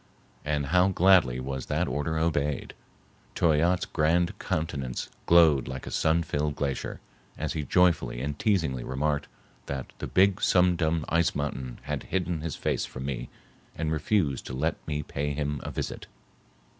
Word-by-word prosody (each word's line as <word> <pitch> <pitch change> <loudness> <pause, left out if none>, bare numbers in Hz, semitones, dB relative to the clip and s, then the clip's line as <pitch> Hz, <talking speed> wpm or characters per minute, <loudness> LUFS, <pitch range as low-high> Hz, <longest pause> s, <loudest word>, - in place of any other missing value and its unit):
And 75 -1 0
how 90 +5 +4
gladly 90 -9 +4
was 65 0 -4
that - - 0
order 80 +2 -1
obeyed! 75 -3 0 0.6
Toyatte's 85 +3 +3
grand 85 +2 +1
countenance 70 -6 -3 0.2
glowed 80 -6 +6
like 65 0 -6
a - - -6
sun 80 +2 +2
filled 75 -2 -1
glacier, 70 -4 -3 0.4
as - - -2
he 80 - -2
joyfully 85 -4 +2
and 70 +3 -4
teasingly 80 - +1
remarked 75 +2 -1 0.4
that 70 -2 -5
"the - - -4
big 95 +1 +3
Sum 90 -1 +4
Dum 80 -1 0
ice 85 0 +2
mountain 65 -4 -3
had 75 -3 -3
hidden 90 -4 -1
his 80 -1 -3
face - - -1
from 65 0 -6
me 70 -3 -4 0.5
and 80 -1 -2
refused 80 - 0
to - - -6
let 75 +5 0
me 75 -1 -2
pay 75 +1 -3
him 75 -1 -2
a - - -5
visit." - - -5
75 Hz, 155 wpm, -27 LUFS, 70-85 Hz, 0.6 s, glowed